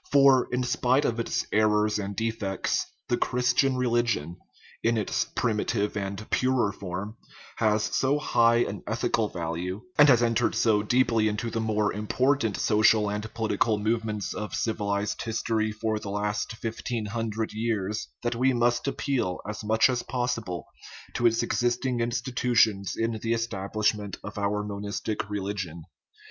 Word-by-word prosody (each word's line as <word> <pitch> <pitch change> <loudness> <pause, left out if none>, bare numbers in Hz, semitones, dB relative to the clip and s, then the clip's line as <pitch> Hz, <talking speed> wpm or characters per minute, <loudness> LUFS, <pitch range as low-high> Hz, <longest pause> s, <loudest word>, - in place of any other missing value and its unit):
For, 135 -2 +5
in 125 +1 0
spite 130 +3 +2
of 120 0 0
its 115 - -1
errors 105 0 +3
and 100 0 -4
defects, 110 -3 -1 0.2
the 120 - +1
Christian 125 +2 +2
religion 120 -10 0 0.5
(in 115 0 +2
its 105 - 0
primitive 105 -1 0
and 100 +1 -4
purer 130 -5 +2
form) 100 +3 -6 0.4
has 110 -1 +2
so 135 +6 +1
high 115 -4 +3
an 100 - -5
ethi 115 +2 -2
cal 110 -2 +2
value, 90 +3 -4 0.2
and 150 0 +8
has 120 -3 +5
entered 115 -1 +1
so 110 -3 +3
deeply 115 -1 +2
into 110 +2 -2
the 115 - -1
most 105 -2 0
im 105 +1 -5
portant 130 -4 +1
social 105 -1 +3
and 105 +1 -4
political 110 -1 +1
movements 110 -1 -1
of 105 - -4
civilized 105 -2 -1
his 115 -1 -3
tory 110 -2 0
for 110 0 -2
the 100 - -7
last 105 +1 -2
fifteen 115 0 -4
hundred 110 0 -3
years, 110 -2 -2 0.2
that 120 - 0
we 130 +3 +2
must 120 +2 +1
appeal 135 -10 -1
as 105 +1 -5
much 110 +1 +4
as 125 -2 0
possible 120 -8 -3 0.5
to 120 - +3
its 115 0 +2
existing 120 +1 0
institutions 120 -4 +1
in 115 +1 0
the 115 0 0
establishment 105 -2 -1
of 105 0 -6
our 105 +1 0
monistic 105 +1 -4
religion. 95 -5 -4
110 Hz, 155 wpm, -27 LUFS, 105-120 Hz, 0.5 s, and